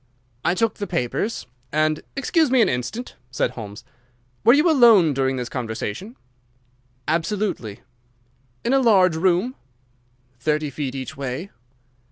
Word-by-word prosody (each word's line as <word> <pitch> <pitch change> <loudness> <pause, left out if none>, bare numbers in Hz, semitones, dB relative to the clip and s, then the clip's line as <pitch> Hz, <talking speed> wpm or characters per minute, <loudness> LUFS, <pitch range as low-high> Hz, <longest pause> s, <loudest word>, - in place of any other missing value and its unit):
"I 175 - +2
took 225 +1 0
the 205 - -4
papers 170 - -2 0.3
and—" 155 0 +1
"Excuse 300 +3 +2
me 260 0 +3
an - - +2
instant," 125 - -4
said 125 - 0
Holmes. 105 -2 -9 0.6
"Were 235 - +7
you 300 +4 +4
alone 230 - +6
during 135 0 0
this 125 -2 -3
conversation?" 120 - -5 0.9
"Absolutely." 165 - -2 0.8
"In 240 - +2
a 270 - +5
large 190 -9 +4
room?" 185 +8 +1 0.9
"Thirty 150 +2 0
feet 140 -1 -4
each 130 -3 -6
way." 135 +7 -5
165 Hz, 130 wpm, -22 LUFS, -, 0.9 s, Were